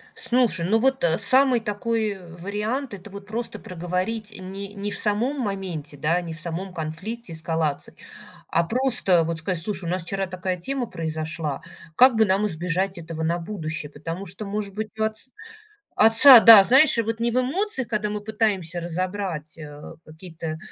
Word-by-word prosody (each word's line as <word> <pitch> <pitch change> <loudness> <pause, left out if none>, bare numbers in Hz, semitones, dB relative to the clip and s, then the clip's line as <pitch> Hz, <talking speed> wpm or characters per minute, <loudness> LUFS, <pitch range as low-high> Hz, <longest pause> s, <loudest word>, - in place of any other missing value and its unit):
Слушай, 235 -9 +1
ну 220 +5 +2
вот, 265 0 +1
э, 165 -1 +3
самый 255 +4 +4
такой, 220 +1 -2
э, 190 -3 -10
вариант- 210 +8 -3
это 200 +1 -9
вот, 200 0 -10
просто 230 +2 -5
проговорить, 185 +5 -4
не 195 +2 -7
не 205 0 -4
в - - -1
самом 235 +7 0
моменте, 185 - -4
да, 160 +5 +1
не 165 -2 -6
в 160 - -8
самом 175 +3 -5
конфликте, 175 +6 -6
эскалации, 160 -2 -3 0.5
а 170 - +2
просто, 230 -5 +2
вот, 165 0 -3
сказать: 170 +1 -2
слушай, 195 -3 -4
у 165 - -2
нас 180 -1 -2
вчера 195 +2 -3
такая 185 0 -3
тема 255 +7 -3
произошла, 155 -3 -4 0.3
как 255 +3 +6
бы 220 0 +4
нам 195 +2 +1
избежать 180 +2 -2
этого 165 -1 -6
на 170 +2 0
будущее? 165 -5 -5
Потому 165 +6 -6
что, 195 +4 -6
может 200 0 -4
быть, 215 +1 -4
у - - +1
отц 220 +3 -3 0.7
отца 230 +4 +9
да, 220 -3 +10
знаешь, 265 +6 +5
вот 225 0 -1
не 235 +1 +1
в 250 - +2
эмоциях, 270 - -1
когда 215 -2 -1
мы 210 0 -4
пытаемся 205 -6 -1
разобрать, 175 -2 -4
э, 145 -1 -10 0.3
какие-то 160 0 -7
195 Hz, 175 wpm, -23 LUFS, 165-220 Hz, 0.7 s, да